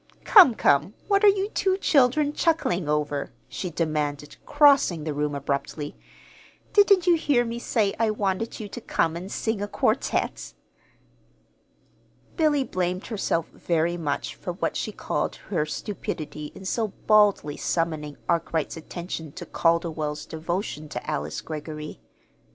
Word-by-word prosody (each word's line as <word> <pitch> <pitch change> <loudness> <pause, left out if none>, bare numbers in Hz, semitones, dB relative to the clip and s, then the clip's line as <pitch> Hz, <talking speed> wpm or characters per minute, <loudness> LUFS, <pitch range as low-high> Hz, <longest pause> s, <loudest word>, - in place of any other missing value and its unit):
"Come, 355 - +8
come, 145 +6 +2
what 400 0 +3
are - - +8
you 395 0 +1
two 380 -3 +1
children 290 -3 +3
chuckling 190 - 0
over?" 150 -1 -1 0.2
she 185 - -4
demanded, 150 -3 -2
crossing 280 - +4
the 155 -1 -2
room 145 0 -1
abruptly. 140 +1 -3 0.8
"Didn't 400 -3 +5
you 355 - +6
hear 285 -7 +2
me 235 0 -4
say 215 -4 +1
I 225 -1 +3
wanted 210 +1 -2
you 215 - -5
to 240 - -8
come 165 -6 0
and 185 +4 -6
sing 220 -2 -2
a 205 - -2
quartet?" - - -1 1.8
Billy 300 -4 +3
blamed 185 -4 -2
herself 195 -7 -1
very 170 0 0
much 150 -5 -3
for - - -6
what - - -2
she - - -2
called - - -2
her 150 - -2
stupidity 150 -4 -5
in 190 - -10
so 220 +4 0 0.2
baldly 205 -9 +4
summoning 155 -3 -2
Arkwright's 165 -2 -1
attention 165 -1 -6
to - - -8
Calderwell's 165 -3 0
devotion 160 -1 -4
to - - -6
Alice 150 - -3
Greggory. 155 -1 -7
175 Hz, 140 wpm, -25 LUFS, 155-235 Hz, 1.8 s, Come